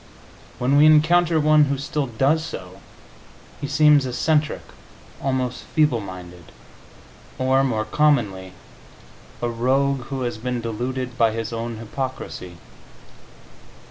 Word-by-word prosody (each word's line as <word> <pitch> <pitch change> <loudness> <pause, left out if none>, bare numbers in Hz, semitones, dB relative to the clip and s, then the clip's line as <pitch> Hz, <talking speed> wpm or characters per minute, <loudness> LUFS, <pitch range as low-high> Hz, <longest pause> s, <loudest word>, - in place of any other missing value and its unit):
When 130 +3 +2
we 150 +1 +7
encounter 165 +2 +4
one 155 0 +5
who 140 0 -1
still 140 +1 -3
does 135 +7 +1
so, 95 - -8 0.8
he 145 - -3
seems 150 -1 +5
eccentric, 150 +4 0 0.6
almost 130 -2 -2
feeble 150 -6 +1
minded 90 -3 -10 0.9
or, 130 +1 +2
more 110 -5 -1
commonly, 110 -9 +1 0.9
a 120 - +1
rogue 130 +2 0
who 135 0 -5
has 120 -2 -3
been 125 +1 -3
deluded 125 +2 -4
by 115 -2 +3
his 115 0 -4
own 115 0 -4
hypocrisy. 115 -6 -6
130 Hz, 115 wpm, -22 LUFS, 115-145 Hz, 0.9 s, we